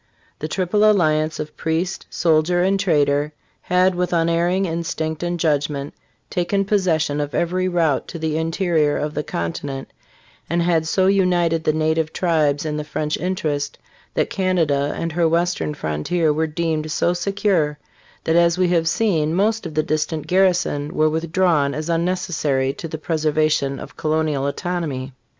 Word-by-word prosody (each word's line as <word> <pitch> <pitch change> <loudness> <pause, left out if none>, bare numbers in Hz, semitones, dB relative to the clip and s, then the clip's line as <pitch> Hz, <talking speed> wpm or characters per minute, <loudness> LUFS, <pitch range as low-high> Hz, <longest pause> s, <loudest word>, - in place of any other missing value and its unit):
The 155 - -3
triple 185 +5 0
alliance 155 -6 +2
of 155 0 -6
priest, 165 +4 -2
soldier 170 +2 +2
and 195 +1 +2
trader 150 -5 +2 0.3
had 185 +1 +2
with 180 0 -1
unerring 170 +3 +2
instinct 160 -2 -3
and 175 0 -2
judgment 145 -2 0 0.3
taken 195 +3 0
possession 165 -8 +1
of 145 0 -4
every 185 +2 0
route 165 -6 +1
to 170 - -7
the 160 -1 -2
interior 160 -2 +1
of 150 0 -2
the 150 - -1
continent, 135 - -5 0.6
and 170 0 +1
had 165 -2 +1
so 185 +3 +2
united 175 -4 +2
the - - +4
native 160 0 0
tribes 155 -5 +1
in 150 -1 -2
the 150 - -3
French 150 0 -2
interest 150 -5 -2 0.4
that - - 0
Canada 160 -7 +1
and 165 - -2
her 165 0 +2
western 170 -2 0
frontier 150 - 0
were 160 +1 0
deemed 155 -1 -2
so 175 +1 +1
secure 180 -4 0 0.5
that, 160 - +1
as 170 0 +4
we 185 -1 +2
have 165 -2 +2
seen, 165 -4 +1
most 215 +1 +1
of 155 - -10
the 155 - +2
distant 155 0 -2
garrisons 175 -6 +1
were 155 -2 +2
withdrawn 160 -3 +1
as 155 +2 -4
unneces 180 +2 0
sary 135 -4 0
to 165 - -7
the 160 - -5
preservation 155 -3 0
of - - -10
colonial 155 -3 0
autonomy. 140 -4 -3
160 Hz, 160 wpm, -21 LUFS, 150-175 Hz, 0.6 s, the